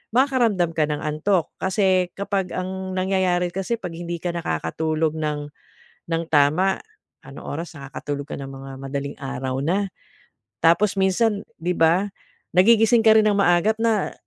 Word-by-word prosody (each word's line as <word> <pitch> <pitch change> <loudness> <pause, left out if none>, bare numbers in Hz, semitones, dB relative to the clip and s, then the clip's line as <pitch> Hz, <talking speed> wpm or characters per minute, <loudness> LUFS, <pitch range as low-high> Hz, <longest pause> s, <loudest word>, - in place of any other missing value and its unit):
makakaramdam 240 -10 +2
ka 155 -2 +1
ng 150 -1 -3
antok 155 +4 0
kasi 190 -2 +2
kapag 195 -2 -2
ang 185 0 -4
nangyayari 185 -2 +1
kasi 195 +5 -2
'pag 190 -7 -7
hindi 170 +1 -5
ka 175 - 0
nakakatulog 155 - -1
ng 150 -1 -3 0.6
ng 165 0 0
tama 155 +6 +2 0.4
anong 135 +1 -11
oras 165 +1 -6
nakakatulog 140 +1 -5
ka - - -6
ng 135 0 -7
mga 135 0 -9
madaling 140 +1 -4
araw 135 0 -3
na. 190 +7 +1 0.7
Tapos 195 +4 +3
minsan 200 +2 +2 0.2
di 175 +2 -1
ba 175 +4 +3 0.4
nagigising 225 +5 +5
ka 220 -1 +6
rin 215 - +5
ng 205 -1 +2
maaga 175 +2 +4
na 225 -3 +1
175 Hz, 145 wpm, -23 LUFS, 150-195 Hz, 0.7 s, ka